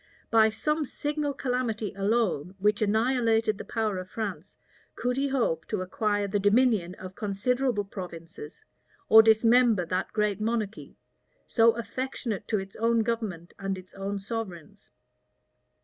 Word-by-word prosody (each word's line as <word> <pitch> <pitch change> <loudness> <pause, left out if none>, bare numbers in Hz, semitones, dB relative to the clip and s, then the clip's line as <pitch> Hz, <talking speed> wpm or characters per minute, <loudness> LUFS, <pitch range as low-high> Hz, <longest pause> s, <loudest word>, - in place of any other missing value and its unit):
By 220 -1 +6
some 300 +8 -1
signal 290 0 -3
calamity 245 -5 -2
alone, 195 -5 0
which 210 +2 +1
annihilated 225 0 +2
the - - -5
power 215 -4 -2
of 185 0 -8
France, 200 -5 -5 0.4
could 250 0 -1
he 275 +2 0
hope 240 - 0
to 210 -4 -2
acquire 205 +2 -1
the 205 +1 0
dominion 205 -3 +3
of 185 0 -9
considerable 225 +3 0
provinces, 170 -5 -9 0.4
or 220 - +10
dismember 225 -2 +4
that 185 +2 -2
great 210 -1 0
monarchy, 220 -1 -3 0.5
so 230 -1 +4
affectionate 235 -3 -4
to 215 - +1
its 195 0 -6
own 230 0 +2
government 215 -7 -3
and 195 -1 -2
its 185 0 -13
own 200 +1 -4
sovereigns. 195 -5 -7
215 Hz, 135 wpm, -27 LUFS, 195-235 Hz, 0.5 s, or